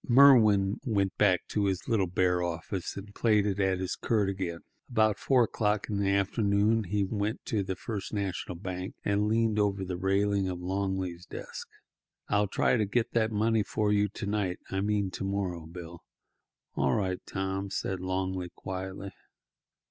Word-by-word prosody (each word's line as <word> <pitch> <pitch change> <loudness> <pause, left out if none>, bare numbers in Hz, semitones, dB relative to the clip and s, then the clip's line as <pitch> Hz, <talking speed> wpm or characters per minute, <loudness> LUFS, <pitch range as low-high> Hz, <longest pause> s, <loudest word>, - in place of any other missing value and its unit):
Merwin 110 -7 +6
went 100 -7 0
back 95 -4 +3
to 105 -1 0
his 95 -2 -1
little 105 -5 +2
bare 90 0 +1
office 90 +2 -3
and 100 +1 -8
plaited 105 -3 +2
at 95 -1 +2
his 95 0 -2
quirt 105 -4 +1
again. 90 -4 -3 0.3
About 110 -3 +2
four 130 -3 +4
o'clock 105 -2 0
in 100 - 0
the 100 -1 +1
afternoon 100 +2 +2
he 100 +2 0
went 105 +2 -2
to 110 - 0
the 95 -1 -3
First 100 0 -5
National 95 -3 -3
Bank 90 +1 -5
and 100 +1 +2
leaned 110 -1 +2
over 100 -2 +1
the 90 -1 -4
railing 100 +1 +1
of 90 -1 -4
Longley's 95 -1 -2
desk. - - -7 0.6
"I'll 105 0 +2
try 115 - +2
to 110 - +2
get 120 +3 0
that 115 -1 +1
money 110 +1 +2
for 105 0 0
you 105 0 +2
to 105 - -6
night—I 95 -2 -2
mean 100 -2 0
to 90 - -5
morrow, 95 -4 -2
Bill." 85 0 -9 0.7
"All 70 -2 +1
right, 95 -3 -1
Tom," 95 0 -3
said 95 -1 -2
Longley 95 0 -2
quietly. 95 +1 -6
100 Hz, 165 wpm, -29 LUFS, 95-105 Hz, 0.7 s, Merwin